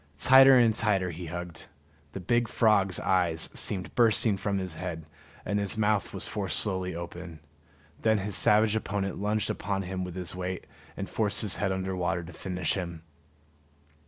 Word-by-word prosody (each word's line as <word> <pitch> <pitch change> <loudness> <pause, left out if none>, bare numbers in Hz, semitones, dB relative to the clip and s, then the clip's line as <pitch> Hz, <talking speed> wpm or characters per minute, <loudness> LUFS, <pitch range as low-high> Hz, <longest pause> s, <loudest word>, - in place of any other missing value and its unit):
Tighter 135 - +7
and 115 -2 +4
tighter 100 -5 0
he 85 +1 -8
hugged; 85 -1 -7 0.5
the - - -5
big 120 +6 0
frog's 100 -6 +2
eyes 85 -4 0
seemed 95 -3 -2
bursting 115 -2 +4
from 100 +1 -2
his 95 -3 -3
head, 80 -2 -6 0.4
and 105 0 -1
his 100 +2 -3
mouth 105 -2 +1
was - - -3
forced 100 -3 0
slowly 95 -3 +1
open. 85 -1 -8 0.6
Then 110 -1 +3
his 100 0 -2
savage 105 +1 +3
opponent 100 -3 -3
lunged 105 0 0
upon 100 0 -3
him 95 0 -4
with 90 -1 -7
his 90 -3 -5
weight, 90 0 -5 0.3
and - - -4
forced 105 -2 0
his 105 - +1
head 95 0 -1
under 95 0 -3
water 90 -1 -1
to 85 +2 -11
finish 90 -1 -2
him. 85 -4 -5
95 Hz, 170 wpm, -28 LUFS, 90-105 Hz, 0.6 s, Tighter